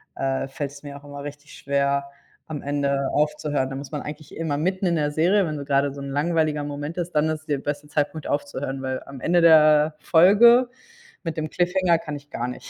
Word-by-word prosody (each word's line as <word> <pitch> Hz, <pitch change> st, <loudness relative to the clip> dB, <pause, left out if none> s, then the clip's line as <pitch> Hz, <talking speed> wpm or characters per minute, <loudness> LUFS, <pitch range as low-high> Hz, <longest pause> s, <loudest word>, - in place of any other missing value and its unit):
äh, 135 Hz, 0 st, -1 dB
fällt's 140 Hz, +1 st, -6 dB
mir 140 Hz, -1 st, -8 dB
auch 145 Hz, -, -16 dB
immer 145 Hz, 0 st, -8 dB
richtig 145 Hz, 0 st, -10 dB
schwer, 140 Hz, 0 st, 0 dB, 0.4 s
am 155 Hz, -2 st, -5 dB
Ende 140 Hz, -1 st, 0 dB
aufzuhören. 150 Hz, -2 st, 0 dB
Da -, -, -4 dB
muss 140 Hz, +1 st, -8 dB
man 150 Hz, -, -3 dB
eigentlich 150 Hz, 0 st, -9 dB
immer 160 Hz, -3 st, -1 dB
mitten 185 Hz, +4 st, -1 dB
in 170 Hz, -, +1 dB
der 150 Hz, -2 st, +1 dB
Serie 180 Hz, +6 st, +3 dB
wenn 155 Hz, -1 st, -4 dB
so 140 Hz, -, -6 dB
grade 140 Hz, 0 st, +1 dB
so 140 Hz, -, -9 dB
'n 140 Hz, -, -6 dB
langweiliger 155 Hz, 0 st, 0 dB
Moment 145 Hz, +2 st, -5 dB
ist, 175 Hz, 0 st, -3 dB
dann 150 Hz, +1 st, +3 dB
ist 155 Hz, 0 st, -4 dB
der 145 Hz, -, +1 dB
beste 145 Hz, +1 st, -4 dB
Zeitpunkt 150 Hz, +1 st, -2 dB
aufzuhören, 140 Hz, -2 st, -3 dB
weil 130 Hz, 0 st, -3 dB
am 140 Hz, -1 st, -10 dB
Ende 175 Hz, 0 st, +3 dB
der 155 Hz, -2 st, +6 dB
Folge 235 Hz, +11 st, +6 dB, 0.5 s
mit 165 Hz, -1 st, -4 dB
dem 155 Hz, -1 st, -2 dB
Cliffhanger 180 Hz, -1 st, +2 dB
kann 150 Hz, -3 st, -6 dB
ich 145 Hz, +1 st, -16 dB
gar 120 Hz, +1 st, -3 dB
nicht. 125 Hz, -, -9 dB
150 Hz, 215 wpm, -23 LUFS, 140-160 Hz, 0.5 s, der